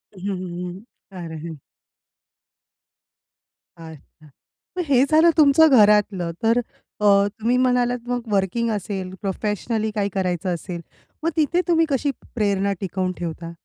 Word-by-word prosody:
हं, - - -12
हं, 195 - -1
हं, 180 -1 -6
हं. 190 - -11 0.4
अरे! 160 -1 -7
हं. 160 - -7 2.2
अच्छा, 160 -1 -14 0.5
मग 360 - 0
हे 265 -2 +4
झालं 320 +2 +6
तुमचं 310 +1 +6
घरातलं. 205 -4 +3
तर 230 +2 +3 0.4
अ, - - -2 0.4
तुम्ही 235 +3 +1
म्हणालात 245 -1 +2
मग 245 -1 -3
वर्किंग 200 +4 0
असेल, 190 -2 -4
प्रोफेशनली 210 +3 -2
काही 205 -1 -1
करायचं 180 -1 -1
असेल, 170 0 -6 0.4
मग 330 - +2
तिथे 335 +4 +2
तुम्ही 330 -1 +3
कशी 280 +1 0 0.2
प्रेरणा 200 -2 +1
टिकवून 185 -1 -2
ठेवता? 170 0 -5
205 Hz, 130 wpm, -22 LUFS, 180-245 Hz, 2.2 s, झालं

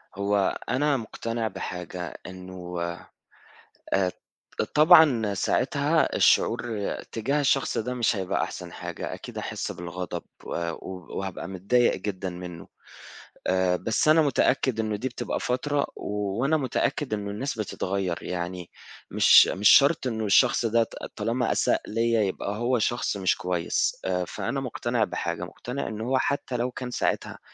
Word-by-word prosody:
هو 100 0 +1
أنا 145 +1 +2
مقتنع 115 0 -3
بحاجة، 90 -3 -6
إنه 90 -1 -7 1.1
آآ 95 -2 +3 0.6
طبعًا 150 - +6
ساعتها 95 - +1
الشعور 110 -4 +2 0.2
تجاه 135 +6 0
الشخص 135 -1 +1
ده 125 +3 -2
مش 120 -2 +1
هيبقى 95 -2 -1
أحسن - - -5
حاجة - - -5
أكيد - - -8
هاحس - - -4
بالغضب 90 0 -5 0.2
و - - -8 0.7
وهابقى 95 -3 -5
متضايق 100 +6 +2
جدًا 95 -1 -4
منه، 90 -1 -8 0.8
آآ 95 -1 +2
بس 110 - 0
أنا 155 +1 +6
متأكد 135 -4 +2
إنه 110 -1 0
دي 115 +6 -3
بتبقى 120 - -3
فترة 140 +3 0
وأنا 105 +9 -1
متأكد 135 -1 -1
إنه 100 -1 -3
الناس 115 +3 -4
بتتغير، 95 -3 -2
يعني 90 0 -4 0.4
مش - - +7
مش 100 +2 +3
شرط 140 0 +6
إنه 110 -3 -2
الشخص 120 +4 +4
ده 115 +1 +3
ط - - -11 0.2
طالما 115 +4 0
أساء - - +2
ليّا 115 0 +1
يبقى 100 +1 -2
هو 120 +2 +1
شخص 120 -1 0
مش 95 -2 +2
كويس، 90 -2 0
آآ 90 -1 0
فأنا 135 +9 -3
مقتنع 120 -3 -1
بحاجة 85 -4 -3
مقتنع 125 +8 -5
إنه 110 0 -5
هو 130 +3 +1
حتى 130 -2 -1
لو 120 +2 -1
كان 125 0 -6
ساعتها - - -1
110 Hz, 140 wpm, -26 LUFS, 95-125 Hz, 1.1 s, مش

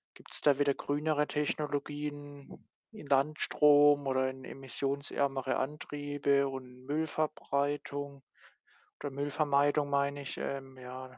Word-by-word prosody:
Gibt’s - - -11
da 145 -1 +4
wieder 140 -1 +3
grünere 150 +1 0
Technologien 145 -1 -4 0.2
in 215 -10 -11
Landstrom 145 0 +4
oder 130 0 +2
in 130 0 -9
emissionsärmere 135 0 -2
Antriebe 145 -1 0
und 130 -1 -9
Müllverbreitung 145 -2 -2 0.8
oder 145 - -2
Müllvermeidung, 145 +1 +1
meine 140 0 +1
ich, 135 - -6
ähm, 135 -1 -5
ja. 130 0 -9
140 Hz, 100 wpm, -32 LUFS, 135-145 Hz, 0.8 s, da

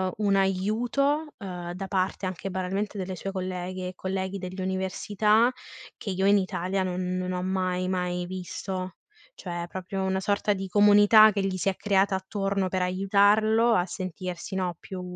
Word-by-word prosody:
un 205 -2 +1
aiuto, 225 +10 +1
uhm, 180 -4 -6
da 190 +2 -5
parte 185 +1 -1
anche 185 +1 -4
banalmente 190 +3 -3
delle 185 -1 -4
sue 195 +2 -5
colleghe 185 -1 -4
e 185 - -10
colleghi 190 +1 -3
dell'università, 190 +4 +1 0.5
che - - -6
io 190 +1 0
in 200 +1 +6
Italia 190 0 -1
non 180 0 -2
non 185 0 -2
ho 180 0 -2
mai 185 -1 -1
mai 180 -1 -1
visto. 185 0 -5 0.4
Cioè, 175 -2 -5
proprio 190 +1 -4
una 190 0 0
sorta 205 +2 0
di 195 -1 -5
comunità 205 +2 +7
che 200 - -1
gli 190 -1 -1
si 185 - +1
è 190 - -2
creata 195 -1 +2
attorno 195 0 -1
per 185 0 -1
aiutarlo 205 +5 +3
a 180 -5 +2
sentirsi, 185 0 -6
no, 180 -2 -1
più 185 -1 -7
190 Hz, 160 wpm, -27 LUFS, 185-200 Hz, 0.5 s, comunità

